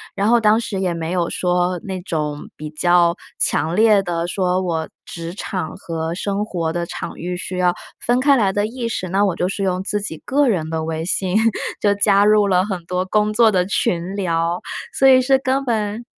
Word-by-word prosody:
然 200 - 0
后 240 0 +5
当 220 0 +4
时 200 -4 -4
也 185 -2 0
没 165 0 -4
有 175 -2 0
说 180 0 0
那 190 -2 -4
种 150 -5 -4
比 155 0 -7
较 170 +2 +3 0.2
强 160 +4 0
烈 215 -1 +5
地 170 -3 -2
说 180 0 0
我 165 -3 -2 0.2
职 170 0 -7
场 185 -5 -4
和 165 0 -4
生 200 +2 -2
活 170 -6 -2
的 170 0 -2
场 - - -6
域 180 +1 -4
需 180 +1 -5
要 180 -1 +3 0.3
分 245 +1 +1
开 280 -1 +5
来 195 -4 +2
的 205 0 +1
意 235 +1 -4
识， 185 -5 -3
那 195 +2 +2
我 190 -4 0
就 180 +2 -1
是 195 +1 -3
用 185 -1 0
自 210 +1 -1
己 195 -6 -5
个 285 +2 +2
人 170 -9 0
的 160 0 -2
微 160 0 -3
信 185 +1 -1 0.5
就 205 -1 +3
加 200 0 +3
入 210 0 +4
了 185 -1 +3
很 185 -5 -5
多 180 +1 -1
工 210 +2 +1
作 225 0 +5
的 180 -2 +2
群 185 -1 -1
聊， 170 -2 -1 0.3
所 270 - +2
以 255 -1 +7
是 265 +1 +3
根 270 +1 0
本 220 -1 -2
185 Hz, 225 characters per minute, -20 LUFS, 170-210 Hz, 0.5 s, 以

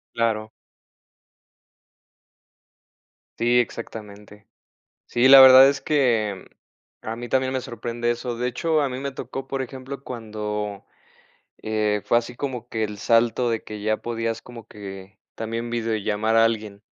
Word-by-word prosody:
Claro. 110 -2 0 2.9
Sí, 120 +1 +3
exactamente. 105 -3 -6 0.6
Sí, 120 +2 +3
la 135 0 +10
verdad 130 0 +10
es 140 0 0
que 115 -10 +1 0.6
a 110 - -5
mí 120 +1 -7
también 130 +1 +1
me 130 - 0
sorprende 120 -1 -3
eso. 120 0 -4
De 125 +1 -1
hecho, 155 +5 0
a 140 - 0
mí 130 0 -5
me 140 0 -4
tocó, 135 +1 -7
por 135 0 -2
ejemplo, 135 +2 -8
cuando, 105 -3 -5 0.8
eh, 105 -1 0
fue 120 - +4
así 120 +1 -9
como 125 -4 -5
que 110 -1 -2
el 105 -1 -5
salto 120 +2 +2
de 115 -1 -2
que 105 -1 -8
ya 110 +1 0
podías 115 -1 -4
como 115 -2 -12
que 95 -1 -10 0.2
también 115 +1 -4
videollamar 110 -1 -1
a 115 0 +6
alguien. 105 -3 -3
115 Hz, 140 wpm, -23 LUFS, 110-125 Hz, 2.9 s, la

